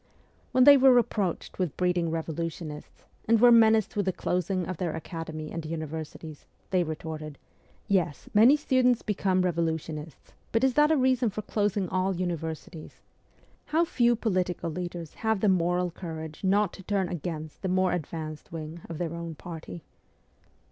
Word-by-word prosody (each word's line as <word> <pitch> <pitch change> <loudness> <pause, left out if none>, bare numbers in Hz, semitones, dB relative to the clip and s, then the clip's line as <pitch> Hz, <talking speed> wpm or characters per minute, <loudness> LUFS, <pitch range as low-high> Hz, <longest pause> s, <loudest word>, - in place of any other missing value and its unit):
When 255 - +5
they 285 +1 +9
were 265 0 +7
reproached 210 -9 0
with 180 -6 -2
breeding 180 -2 +1
revolutionists, 160 -1 -5 0.2
and 230 0 +4
were 245 +1 +7
menaced 220 -1 +5
with 205 -2 0
the - - +3
closing 180 0 -1
of 185 -1 -5
their 170 -3 -2
academy 160 -1 -6
and 165 - -4
universities, 155 -1 -6 0.2
they 185 -2 +3
retorted, 155 -2 -6 0.3
' - - -34
Yes, 160 -6 -3
many 230 +7 +7
students 255 -4 +2
become 190 -3 +1
revolutionists; 160 -3 -3 0.2
but 225 - +1
is 265 -1 +3
that 300 +2 +4
a 315 - +3
reason 255 -2 +2
for 210 +1 -5
closing 205 -2 0
all 185 +2 0
universities? 165 -2 -5 0.4
' - - -33
How 330 +2 +2
few 240 -6 +2
political 185 -6 -1
leaders 175 -1 -6
have 220 -2 +1
the 210 - +3
moral 180 -1 +1
courage 160 -2 -7
not 200 0 +2
to - - -10
turn 195 -1 0
against 160 -2 -5
the 190 - -2
more 185 0 +2
advanced 155 -2 -5
wing 160 +1 -7
of 165 - -5
their 170 -1 -3
own 170 -1 -6
party 165 0 -9
180 Hz, 160 wpm, -27 LUFS, 160-210 Hz, 0.4 s, they